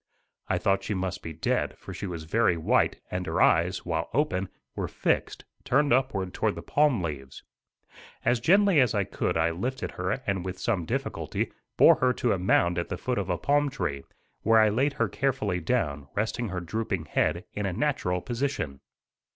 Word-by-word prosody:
I - - +1
thought 100 0 +1
she 105 +2 -2
must 95 0 -3
be 80 - -6
dead, 80 0 -1
for - - -9
she 100 - -5
was 85 -3 -5
very 90 +1 +2
white 80 - +2
and 90 0 -2
her - - -1
eyes, 90 +3 +3
while 80 -2 -2
open, 95 -11 0 0.3
were - - -2
fixed, - - -1 0.2
turned 140 0 +3
upward 120 -8 0
toward - - 0
the - - -7
palm 145 -10 +2
leaves. 70 -5 -6 0.8
As 120 0 +3
gently 190 - +4
as 125 -5 +3
I 100 - +2
could 90 - -2
I 80 +1 +2
lifted 125 +11 -3
her 90 +2 -2
and 95 -3 -1
with 95 0 -5
some 100 -7 -1
difficulty - - -2 0.3
bore - - +7
her 125 -1 +2
to 120 -1 +1
a 95 - -2
mound 90 -1 +2
at 85 - -4
the - - -3
foot 125 -4 -1
of 95 -2 -3
a 90 - +1
palm 145 +5 +2
tree, 70 - -3 0.4
where 110 +1 +5
I 110 -1 +5
laid 135 +7 +1
her - - 0
carefully 130 -10 -1
down, 75 - -1
resting 110 +2 -1
her 90 -2 -3
drooping 95 -2 -3
head 80 +3 0
in 105 -1 -2
a - - -1
natural 90 -8 0
position. 120 - -3
95 Hz, 190 wpm, -27 LUFS, 85-125 Hz, 0.8 s, bore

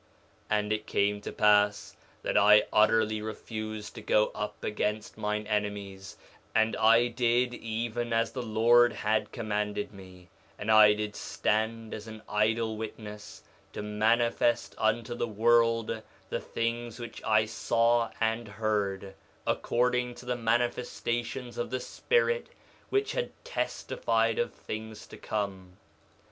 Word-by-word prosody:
3:16 105 - +3
And 105 0 -1
it 110 0 -4
came 105 0 +1
to - - -6
pass 105 -1 +3 0.3
that - - -2
I 105 +1 +7
utterly 110 0 +3
refused 110 0 -6
to 115 - -9
go 105 0 +2
up 105 - -5
against 105 0 -2
mine 105 0 -2
enemies; 100 -2 -3 0.4
and 110 0 +3
I 115 +2 +5
did 120 +1 +1
even 120 +1 -3
as 115 0 +1
the 130 - -4
Lord 120 +2 +4
had 110 +1 0
commanded 105 -1 -2
me; 95 -2 -14 0.3
and 105 +1 -1
I 105 -1 +8
did 105 0 -4
stand 110 +1 -1
as 110 +1 -7
an 110 0 -9
idle 110 +1 +1
witness 105 -1 -8 0.3
to - - -5
manifest 115 +3 +1
unto 110 +2 +1
the 120 0 -2
world 115 0 +2 0.3
the - - -1
things 115 0 -3
which 120 -1 -8
I 110 0 +3
saw 115 +1 +2
and 115 +1 0
heard, 100 -2 -2 0.3
according 125 0 0
to 125 - -12
the 125 0 -1
manifestations 120 +1 -1
of 120 - -2
the 130 +1 -2
Spirit 475 - 0 0.4
which 405 +1 +1
had - - -2 0.2
testified - - -1
of 480 - 0
things 110 0 -7
to - - -12
come. 95 -3 -4
110 Hz, 135 wpm, -29 LUFS, 105-120 Hz, 0.4 s, I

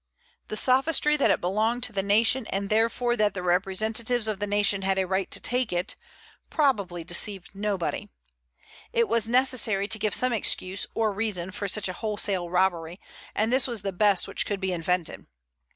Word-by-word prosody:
The 215 - -2
sophistry 285 +5 +3
that 280 - +2
it - - +2
belonged 220 +7 0
to 245 - 0
the 195 - 0
nation, 225 +5 +2
and 195 +1 -3
therefore 230 +2 +1
that 210 -2 +1
the 180 - -4
representatives 215 +6 0
of 215 -3 -2
the 205 - -2
nation 205 -1 +1
had 195 0 0
a 190 - +1
right 190 +1 -1
to - - 0
take 250 -1 -1
it, 175 0 -2 0.5
probably 200 - 0
deceived 180 +2 +1
nobody. 200 -3 -3 0.8
It 465 -1 +2
was 230 - +1
necessary 240 -5 +2
to 220 0 -1
give 210 0 +1
some 255 -1 +2
excuse 195 -3 -1
or 220 -2 +1
reason 195 -4 -2
for 200 +2 -4
such 200 +1 0
a 185 - -4
wholesale 200 -3 -1
robbery, 180 -1 0 0.4
and 220 +3 0
this 260 0 +4
was 235 -5 -4
the 195 -1 -3
best 200 0 +2
which - - -1
could 205 -2 -2
be 190 -1 -2
invented. 175 0 -2
205 Hz, 185 wpm, -26 LUFS, 190-230 Hz, 0.8 s, this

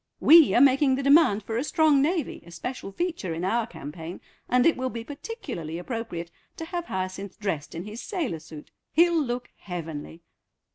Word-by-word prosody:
We 325 -1 +7
are 240 - +6
making 275 0 +5
the 275 - -3
demand 275 -7 +5
for 225 - -3
a 245 - 0
strong 305 -3 +3
Navy 320 0 -1
a 170 - -15
special 195 +6 -6
feature 320 - -3
in 170 +3 -3
our 230 +3 +1
campaign, 160 -3 -8 0.3
and 250 0 +4
it 330 - +5
will 260 0 -2
be 230 -2 -6
particularly 275 - -6
appropriate 175 -4 -5 0.3
to 325 - -5
have 345 0 -4
Hyacinth 190 - -5
dressed 190 -9 -3
in 170 - -4
his 215 +3 -7
sailor 300 - -3
suit. 155 -1 -12 0.2
He'll 335 +1 +4
look 245 -1 -4
heavenly." 165 -3 -7
235 Hz, 180 wpm, -26 LUFS, 175-290 Hz, 0.3 s, We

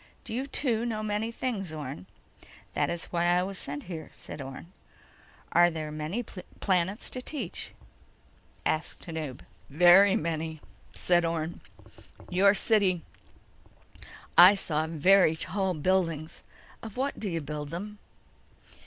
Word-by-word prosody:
"Do - - -7
you, 260 +4 -2
too, 240 -5 0
know 220 -3 -2
many 215 +2 -1
things, 220 -8 -3
Orne?" 140 -10 -7 0.7
"That's 170 -1 -1
why 170 -1 +1
I 175 +1 +3
was 195 0 -4
sent 145 +1 -5
here," 165 -3 -7
said - - -8
Orne. 135 +6 -9 0.8
"Are 175 0 +6
there 155 -2 -5
many 155 +10 -3
planets 190 0 -2
to 255 - -5
teach?" 250 - -6 0.9
asked 155 +1 -1
Tanub. 155 -6 -5 0.3
"Very 180 +6 +7
many," 160 -1 -2 0.4
said 175 -1 +3
Orne. 165 0 -2 0.7
"Your 195 +3 +5
city—I 190 -1 +1
saw 160 -5 0
very 165 +1 +5
tall 190 +2 -2
buildings. 165 -1 0 0.4
Of 225 +1 -9
what 275 +2 -1
do 210 - -3
you 165 -2 -2
build 150 0 -5
them?" 205 +6 -6
175 Hz, 125 wpm, -28 LUFS, 160-200 Hz, 0.9 s, Very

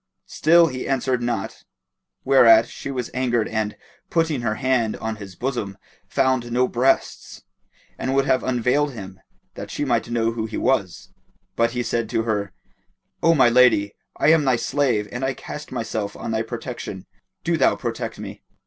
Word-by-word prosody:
Still 170 +2 +4
he 130 -5 -4
answered 130 -2 0
not, 120 -5 -3 0.6
whereat 115 -4 +6
she - - -8
was 125 -3 -4
angered 120 -3 0
and, 110 -1 -2 0.3
putting 160 -5 0
her 110 -2 -1
hand 125 -4 0
to 110 0 -4
his 100 -3 -10
bosom, 115 -6 -3 0.3
found 130 -3 0
no 125 +1 +2
breasts 130 +3 0 0.6
and 130 +1 -1
would 135 0 +3
have 130 -2 +2
unveiled 130 +3 +1
him, 95 -4 -9 0.3
that - - -8
she - - -3
might - - 0
know 115 -1 +1
who 115 -1 -3
he 110 - -5
was; 100 -9 -1 0.5
but 115 0 +1
he 120 0 -1
said 115 -1 -2
to 115 - 0
her, 105 -4 -2 0.7
"O 165 0 +4
my 130 - +5
lady, 120 -5 +4 0.2
I - - +3
am 160 -1 +5
thy 130 -3 +3
slave 120 -5 0
and 125 +2 -5
I 135 0 -1
cast 150 - -8
myself 110 -4 -3
on - - -5
thy 110 0 0
protection: 115 -4 -6 0.4
do - - +1
thou - - +3
protect - - -4
me." - - -8
120 Hz, 170 wpm, -22 LUFS, 110-130 Hz, 0.7 s, whereat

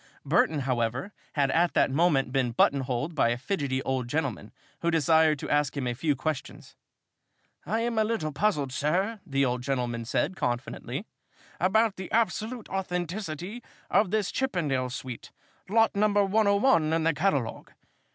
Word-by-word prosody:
Burton, 155 -2 +2
however, 125 - -1 0.2
had 140 -3 +2
at 170 +3 +2
that - - +3
moment 140 -4 +2
been 130 -3 0
button 140 +4 +3
holed 135 +5 -2
by 135 -6 +2
a 120 - 0
fidgety 135 -3 -2
old 130 -2 -1
gentleman 135 -7 -2 0.3
who 170 - 0
desired 160 -1 +4
to - - -6
ask 145 -1 +1
him 135 - -1
a 120 - -1
few 145 +4 0
questions. 150 +2 -5 0.9
"I 220 +6 0
am 230 -1 0
a - - +4
little 215 -9 -1
puzzled, 145 -6 0
sir," 185 - 0
the 140 -1 +1
old 125 -1 -1
gentleman 125 -3 -2
said, 125 +10 0
confidentially, 120 -6 -3 0.5
"about 210 +4 +2
the 190 -1 -7
absolute 225 +1 0
authenticity 180 +2 -4 0.3
of 210 - +3
this 210 -1 0
chippendale 150 - -1
suite 125 -1 -7 0.4
lot 225 +1 +3
number 205 0 +3
101 200 -4 +3
in 165 0 +1
the 165 +1 +3
catalogue. 145 -8 -1
155 Hz, 155 wpm, -27 LUFS, 130-200 Hz, 0.9 s, desired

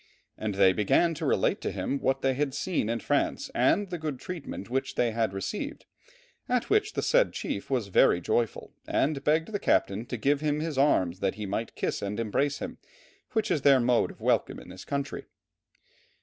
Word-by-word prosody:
And 105 -2 -3
they 95 -1 +5
began 105 - +3
to 150 - -3
relate - - +1
to - - -2
him 140 - -2
what 135 - 0
they 135 0 +3
had 135 0 -1
seen 170 - -1
in 115 -1 -1
France - - 0
and 200 -1 +2
the 175 - -3
good 150 -4 -3
treatment 155 - -6
which 135 +2 -2
they 120 -2 +2
had 110 -2 0
received, 95 - -5 0.6
at 250 -1 0
which 425 0 +2
the - - -2
said - - +3
chief 285 - -4
was 125 -7 -1
very 90 - +4
joyful, 110 +5 -1
and 140 -1 0
begged 160 +6 +1
the 205 - -2
captain 105 - +1
to 125 - -4
give 140 +5 +1
him 150 -1 0
his 160 -1 -3
arms 95 -11 +2
that 95 -1 0
he 105 0 -5
might 105 +4 -3
kiss - - -2
and 100 +1 -3
embrace 135 +6 0
them, 255 0 -7 0.5
which 220 -1 0
is 150 - +1
their 140 -1 +6
mode 120 0 +2
of - - -13
welcome - - +1
in - - -13
this 90 +1 -10
country. 140 0 -3
135 Hz, 200 wpm, -28 LUFS, 110-160 Hz, 0.6 s, their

